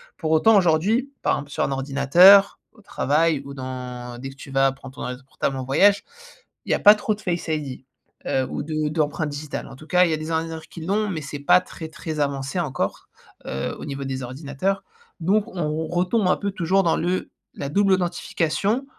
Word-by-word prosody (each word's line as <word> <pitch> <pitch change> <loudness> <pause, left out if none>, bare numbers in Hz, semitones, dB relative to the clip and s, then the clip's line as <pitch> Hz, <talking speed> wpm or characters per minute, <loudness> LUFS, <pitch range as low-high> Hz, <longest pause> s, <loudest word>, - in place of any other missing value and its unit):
Pour 160 -3 -3
autant, 185 +8 +5
aujourd'hui, 200 - +2
par - - +2
exemple 145 0 -4
sur - - -3
un - - -3
ordinateur, 145 +9 +6
au 220 - -21
travail 155 -4 +1
ou 140 - -8
dans 125 -2 -6
dès 135 +2 -6
que 135 - -12
tu 135 - -11
vas 135 0 +3
prendre 130 0 -12
ton - - -9
ordi 125 +1 -5
portable 135 0 -2
en 130 - -4
voyage, 200 +10 +4 0.6
il - - -3
y - - +5
a - - +1
pas 210 +1 +8
trop 215 +1 -1
de - - -19
Face 175 -3 -2
ID. 140 -4 -4 0.4
Heu, 130 -1 0
ou - - -4
de 155 0 -2
d'empreinte 155 0 -1
digitale. 145 0 -6
En 135 - -11
tout 155 +4 -14
cas, 180 0 +4
il 170 - 0
y - - +2
a - - 0
des 155 +1 -5
ordinateurs 160 0 -2
qui - - -10
l'ont, 210 +3 0
mais, 165 -5 -3
c'est 145 0 -6
pas 140 +5 +5
très, 160 -1 -9
très 160 0 -6
avancé 140 +3 -2
encore, 140 -5 -3 0.4
heu, 65 +1 -3
au - - -9
niveau 140 -1 -5
des 130 -1 -4
ordinateurs. 145 +9 -3 0.4
Donc, 195 +6 +2
on 160 -2 -2
retombe 180 +5 +1
un - - +3
peu 200 -1 -2
toujours 190 +1 +1
dans 165 - +2
le 180 +2 -1 0.3
la 140 - -4
double 195 +5 +2
authentification, 185 - -1
155 Hz, 215 wpm, -23 LUFS, 135-185 Hz, 0.6 s, pas